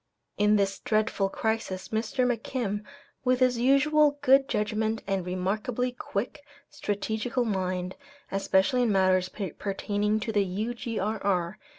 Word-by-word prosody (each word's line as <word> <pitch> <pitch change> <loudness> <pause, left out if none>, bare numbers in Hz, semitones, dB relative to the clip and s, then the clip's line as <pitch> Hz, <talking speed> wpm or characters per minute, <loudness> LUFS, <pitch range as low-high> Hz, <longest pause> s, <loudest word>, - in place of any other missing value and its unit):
In 210 +1 +3
this 200 -1 +1
dreadful 215 -4 0
crisis 220 -3 -2
Mr. 225 +4 0
McKim, 230 -3 -2 0.4
with 255 -1 +2
his 250 -2 +3
usual 290 +3 +4
good 270 0 +5
judgment 215 +1 -1
and 195 -2 -1
remarkably 210 +8 -1
quick, 245 +3 -4 0.3
strategical 220 +4 -2
mind, 185 -3 -2 0.4
especially 195 +5 +2
in 235 -3 +2
matters 185 -1 +3
pertaining 205 +2 -2
to 225 - -2
the 205 -2 +2
U.G.R.R. 205 -2 -2
215 Hz, 115 wpm, -27 LUFS, 195-245 Hz, 0.4 s, good